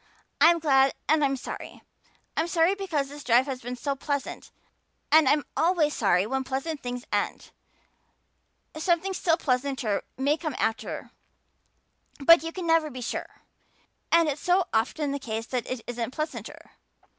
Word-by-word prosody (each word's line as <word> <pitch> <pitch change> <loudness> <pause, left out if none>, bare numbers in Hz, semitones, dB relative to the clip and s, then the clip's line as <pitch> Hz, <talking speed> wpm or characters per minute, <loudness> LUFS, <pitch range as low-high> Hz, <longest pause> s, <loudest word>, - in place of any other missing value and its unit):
I'm 335 +3 +7
glad 270 -4 +3
and 310 0 +3
I'm 275 -1 +1
sorry. 255 - -8 0.5
I'm 320 - 0
sorry 335 +2 +3
because 350 -8 -2
this 290 0 -10
drive 245 +2 +4
has 265 -3 -5
been 245 +2 -5
so 280 +3 -2
pleasant 285 0 -4 0.6
and 315 -2 +6
I'm 295 +1 +3
always 325 -3 +2
sorry 190 -3 +2
when 265 +4 -1
pleasant 275 +4 -3
things 245 0 -5
end. - - -2 1.2
Something 345 +4 0
still 335 -3 +1
pleasanter 255 -7 -1 0.2
may 285 +4 +1
come 310 -5 -4
after, 225 0 -2 1.1
but 315 +2 +7
you 325 +1 -5
can 365 0 -6
never 325 -2 +3
be 255 -2 -8
sure. 235 - -6 0.7
And 335 -1 +5
it's 295 -1 -2
so 360 0 +3
often 275 +6 0
the 280 - -2
case 225 -3 -4
that 245 -2 -3
it 255 -2 -3
isn't 240 -1 -3
pleasanter. 305 0 -6
285 Hz, 155 wpm, -26 LUFS, 255-325 Hz, 1.2 s, I'm